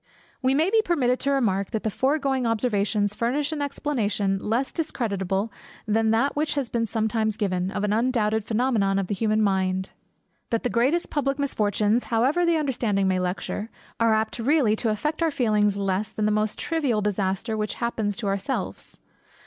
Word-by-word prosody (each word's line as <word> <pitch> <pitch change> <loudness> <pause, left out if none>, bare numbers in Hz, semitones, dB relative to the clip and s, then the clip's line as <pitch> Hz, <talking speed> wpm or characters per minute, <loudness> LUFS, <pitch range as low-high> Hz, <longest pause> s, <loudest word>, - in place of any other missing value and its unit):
We 260 0 +2
may 320 +6 +2
be 445 0 +5
permitted 260 - +1
to 280 - 0
remark, 200 -8 +1
that 220 -2 -3
the 220 - -1
foregoing 270 0 +1
observations 210 -3 +1
furnish 270 +8 -1
an 305 -2 -3
explanation, 215 -9 -1
less 230 +7 -1
discreditable 200 - -2 0.3
than 220 +1 +2
that 230 +6 +2
which 300 0 0
has 275 -5 -1
been 230 -1 -1
sometimes 220 -1 0
given, 185 -3 -1
of 205 +1 -3
an 210 0 +1
undoubted 220 -2 +1
phænomenon 220 -4 +1
in 195 - -1
the 205 - -3
human 215 +1 +1
mind, 190 -1 0 0.6
that 230 - -1
the 245 - 0
greatest 270 +9 +1
public 275 -2 0
misfortunes, 215 -4 +1
however 260 +10 +2
the 335 -1 +3
understanding 235 -9 0
may 185 -1 +1
lecture, 185 +4 -3 0.3
are 230 -1 +4
apt 220 +2 -1
really 250 -3 +3
to 230 - 0
affect 300 +10 -2
our 330 - +3
feelings 210 -7 +1
less 195 +1 -1
than 215 - -2
the 215 - +2
most 215 0 0
trivial 280 -10 0
disaster 205 +2 -1
which 215 -1 -2
happens 220 -4 -2
to 235 - -4
ourselves. 200 +7 -3
220 Hz, 175 wpm, -25 LUFS, 205-265 Hz, 0.6 s, be